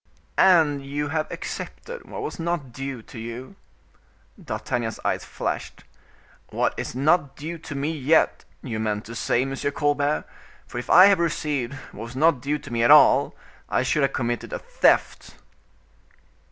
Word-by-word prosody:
"And 160 -7 +5
you 145 +1 -3
have 155 0 -1
accepted 485 0 -7
what 440 - -6
was 430 - -5
not 165 -6 -2
due 135 -2 -6
to 115 - -11
you." 120 - -7 0.9
D'Artagnan's 115 -2 -3
eyes - - 0
flashed. - - -5 0.7
"What - - 0
is - - -5
not 140 0 +2
due 165 +3 -6
to 150 - -8
me 140 +3 -1
yet, 155 +1 +2 0.2
you 115 -5 -4
meant 105 -1 -2
to 115 - -8
say, 120 +2 +1
M. 135 0 -4
Colbert; 145 +1 0 0.4
for 120 - -6
if 125 - -8
I 185 - +9
have 200 -3 +5
received 150 -6 -1 0.2
what 110 - -8
was 120 +2 -10
not 150 -1 +3
due 145 +3 -1
to 120 - -10
me 115 - 0
at 120 - +4
all, - - +6 0.3
I - - +1
should 150 - +1
have 135 - +2
committed 120 -2 -2
a - - -1
theft." - - +1
140 Hz, 165 wpm, -24 LUFS, 120-155 Hz, 0.9 s, I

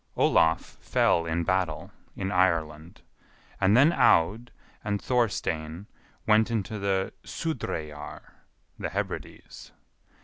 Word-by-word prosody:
Olaf 80 0 +2
fell 85 -1 +2
in 80 +1 -1
battle 90 -3 -1 0.2
in 95 - -3
Ireland, 85 -3 0 0.6
and 100 +3 +4
then 145 +6 +6
Aud 110 - +3 0.3
and 105 -1 -1
Thorstein 95 -9 -1 0.4
went 110 +1 +4
into 110 -2 -2
the 95 -1 -1
Sudreyjar 75 - -5 0.6
(the - - -3
Hebrides). - - -6
95 Hz, 100 wpm, -27 LUFS, 80-110 Hz, 0.6 s, then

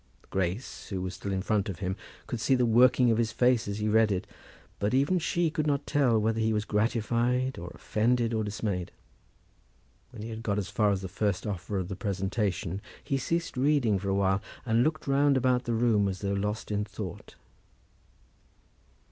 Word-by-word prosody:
Grace, 95 +6 -3
who 95 - -3
was 90 0 -4
still 100 - -5
in 95 -1 -1
front 105 -1 0
of 95 - -4
him, 95 +1 -2 0.3
could 120 - -4
see 120 +5 +3
the 125 -1 +2
working 125 +1 +5
of 115 - +1
his 115 -2 +1
face 125 0 +2
as 100 0 -3
he 105 0 -1
read 110 0 +4
it; 95 -2 -1 0.5
but 105 +6 +1
even 140 +7 +3
she 170 0 0
could 155 -1 -1
not 145 -1 0
tell 130 -6 +3
whether 110 +1 +1
he 110 0 +2
was 105 0 0
gratified, 120 +4 0
or 85 +1 -6
offended, 120 +1 +1
or 110 -1 0
dismayed. 105 -4 -3 1.2
When 120 -4 -9
he 115 - -5
had 110 0 -6
got 105 -3 -1
as 100 -2 -2
far 105 0 +2
as 100 -1 0
the - - -3
first 100 +1 -1
offer 100 0 -3
of 95 -2 -2
the 95 - -5
presentation, 95 -1 -2 0.2
he 135 -2 -1
ceased 170 +3 -2
reading 130 -6 +2
for 100 +1 -3
a 95 - +1
while, 95 0 +2 0.2
and 115 0 +3
looked 155 +2 -1
round 140 0 +3
about 125 -1 +2
the 120 - -1
room 110 -3 +3
as 95 -1 -4
though 100 -1 -1
lost 105 +2 -2
in 105 0 0
thought. 100 -3 -7
110 Hz, 200 wpm, -29 LUFS, 100-125 Hz, 1.2 s, working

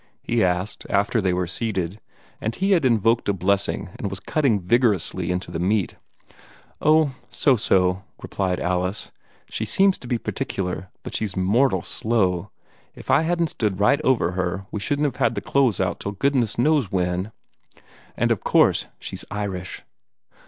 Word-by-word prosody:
he 115 -1 +1
asked, 90 +3 -1
after 100 +3 +2
they 95 -2 +1
were 90 0 0
seated, 95 0 -3 0.4
and 110 +1 -2
he 195 +1 0
had 170 -7 +4
invoked 115 -2 +2
a - - +3
blessing 95 0 -1
and 100 - -2
was 95 -1 -5
cutting 135 -7 +1
vigorously 95 -3 +1
into 90 -1 -2
the 80 - -3
meat. 100 +3 0 0.9
"Oh, 155 -2 +4 0.2
so 135 - +3
so," 95 -4 +2 0.2
replied 95 -2 -2
Alice; 90 +2 -2 0.4
"she - - -4
seems 195 0 +2
to 125 - -10
be 120 -1 0
particular, 90 -4 -4
but - - -7
she's 105 -4 -2
mortal 95 +1 +2
slow. 95 -7 0 0.5
If - - -5
I - - +5
hadn't 170 0 0
stood 105 -4 -1
right 140 +9 +3
over 125 - +2
her, 90 +1 -2
we 105 - -3
shouldn't 145 +8 0
have 135 -4 -2
had 120 -3 +1
the - - -1
clothes 130 -7 +1
out - - -1
till 100 - -4
goodness 125 +1 +1
knows 140 -4 +2
when. 90 +2 -1 0.9
And - - +1
of - - 0
course - - +3
she's - - -6
Irish!" 95 -3 -5
100 Hz, 165 wpm, -23 LUFS, 90-125 Hz, 0.9 s, I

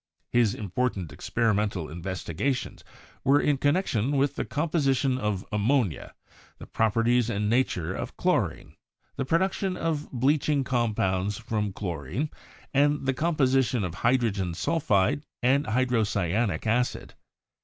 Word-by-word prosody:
His 120 -4 +3
important 100 -4 -2
experimental 105 -7 0
investigations 95 - -3 0.4
were 140 +2 +5
in 145 -2 +1
connection 145 - +1
with 140 +1 +1
the - - -2
composition 140 -4 +1
of 105 -4 -2
ammonia, 105 - 0 0.4
the - - -10
properties 115 +2 +2
and 105 -2 -1
nature 95 -9 +1
of - - -6
chlorine, - - 0 0.4
the 135 - -2
production 190 +4 0
of 155 -2 -2
bleaching 140 +2 +2
compounds 105 -6 0
from 105 -2 -2
chlorine, 95 - -4 0.4
and 145 0 +2
the 135 - +2
com 165 +5 0
position 130 -4 +2
of 90 -3 -3
hydrogen 105 -5 +1
sulphide 140 - +1 0.2
and 140 +4 +3
hydrocyanic 110 -4 0
acid. 120 +3 0
120 Hz, 120 wpm, -27 LUFS, 100-140 Hz, 0.4 s, were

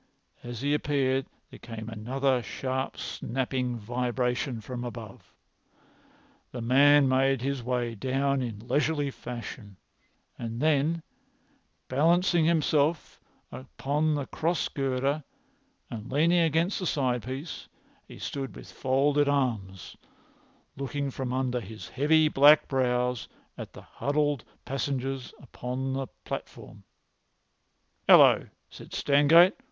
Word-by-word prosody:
As 120 -1 -7
he 145 +1 +1
appeared 135 -3 0 0.2
there - - -12
came 115 -2 -8
another 125 +4 0
sharp 130 +2 -3
snapping 125 0 -3
vibration 125 +2 -2
from 120 +2 -6
above. 115 -4 -9 1.2
The 125 - -6
man 140 +4 +5
made 130 0 +2
his 140 -1 -1
way 120 -1 -1
down 135 +5 0
in 115 -2 -6
leisurely 145 +2 +1
fashion, 120 -5 -8 0.6
and 115 0 -5
then, 155 +2 +1 0.8
balancing 170 +4 +3
himself 155 -1 +1 0.3
upon 145 +4 -1
the 145 -2 -2
cross 165 +5 -1
girder 135 +2 -1 0.7
and 115 +1 -7
leaning 165 +5 +3
against 165 +4 +1
the 185 - -2
side 125 -5 0
piece, 135 +6 -6 0.4
he - - -11
stood 135 -2 -5
with - - -11
folded 140 +2 +2
arms, 110 -10 -2 0.8
looking 140 +1 -3
from 130 -1 -4
under 130 -1 0
his 110 0 -9
heavy 155 +3 +3
black 145 +1 +6
brows 125 -2 0 0.3
at - - -8
the - - -12
huddled 145 -2 -1 0.2
passengers 135 -1 -3
upon 130 +1 -4
the 135 0 -2 0.2
platform. - - -8 1.2
"Hallo!" - - +7 0.2
said - - -12
Stangate. 155 +7 +5
135 Hz, 115 wpm, -28 LUFS, 125-145 Hz, 1.2 s, Hallo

